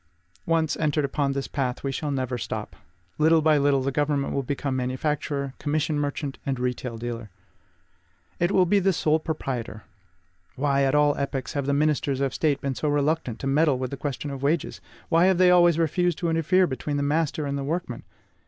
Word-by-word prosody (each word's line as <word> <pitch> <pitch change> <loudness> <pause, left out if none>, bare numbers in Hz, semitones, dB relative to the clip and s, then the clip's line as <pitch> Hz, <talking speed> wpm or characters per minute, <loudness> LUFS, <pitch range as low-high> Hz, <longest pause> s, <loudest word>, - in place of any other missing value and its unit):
Once 165 -2 +1
entered 150 -1 +1
upon 140 0 -1
this 135 0 -3
path, 130 -3 -3
we 135 -1 -2 0.2
never 130 -3 -2
shall 115 - -4
stop. 110 - -5 0.4
Little 160 +1 +5
by 155 -1 +4
little 140 -1 +2
the 135 - 0
government 145 0 0
will 140 - 0
become 140 0 -3
manufacturer, 140 +2 -2
commission 150 0 0
merchant, 145 -1 -3
and 135 -2 -2
retail 125 -1 -3
dealer. 115 -1 -5 1.1
It 175 +2 +2
will 185 -2 +4
be 200 +3 +3
the 195 0 +2
sole 155 -1 +2
proprietor. 125 -9 -4 0.7
Why, 140 0 +1
at 135 +1 +2
all 145 -1 +4
epochs, 140 -2 -3
have 140 -2 -2
the 140 - +2
ministers 145 -2 +1
of 135 -2 0
State 150 -3 0
been 140 -1 -1
so 150 +3 -2
reluctant 145 -4 0
to - - -4
meddle 145 0 +3
with 130 -1 -4
the - - -3
question 145 +1 -4
of 135 -1 -6
wages? 150 +3 -1 0.3
Why 165 +2 +4
have 190 -2 +3
they 180 0 +5
always 175 -2 +5
refused 170 +1 +1
to 170 - -1
interfere 165 +3 +3
between 145 0 -3
the 145 - 0
master 150 +1 0
and 140 0 -2
the 140 - -3
workman? 150 -4 -3
145 Hz, 195 wpm, -25 LUFS, 135-160 Hz, 1.1 s, Little